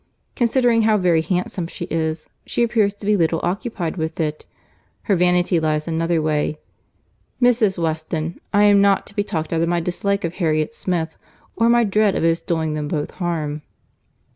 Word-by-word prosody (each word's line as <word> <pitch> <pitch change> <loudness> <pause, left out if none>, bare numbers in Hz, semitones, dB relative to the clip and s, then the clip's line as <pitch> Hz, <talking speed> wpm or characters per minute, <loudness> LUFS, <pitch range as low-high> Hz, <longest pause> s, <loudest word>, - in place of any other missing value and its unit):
Considering 240 -1 +3
how 215 -1 +3
very 175 -4 +3
handsome 180 0 -2
she - - -6
is, 160 -1 -2 0.2
she 240 - 0
appears 225 -3 +2
to 205 0 -12
be 210 +1 +3
little 165 -3 +1
occupied 185 -2 -3
with 160 0 -3
it; 155 -1 -3 0.6
her 200 - +2
vanity 180 0 +2
lies 155 -1 -1
another 165 0 0
way. 155 -1 0 0.8
Mrs. 235 -6 +3
Weston, 160 0 -3
I 205 0 +4
am 205 -1 +6
not 200 -1 +3
to 200 - -11
be 205 - +1
talked 160 -4 -3
out 165 - +1
of 165 - +1
my 175 0 +1
dislike 200 +4 -1
of 170 0 -2
Harriet 155 +1 0
Smith, 170 -7 -3 0.4
or 230 +1 +3
my 240 0 +5
dread 210 -1 +2
of - - -1
its 165 0 +2
doing 160 -2 -1
them 150 -1 -3
both 150 -1 -3
harm." 155 -4 -3
175 Hz, 180 wpm, -21 LUFS, 160-205 Hz, 0.8 s, am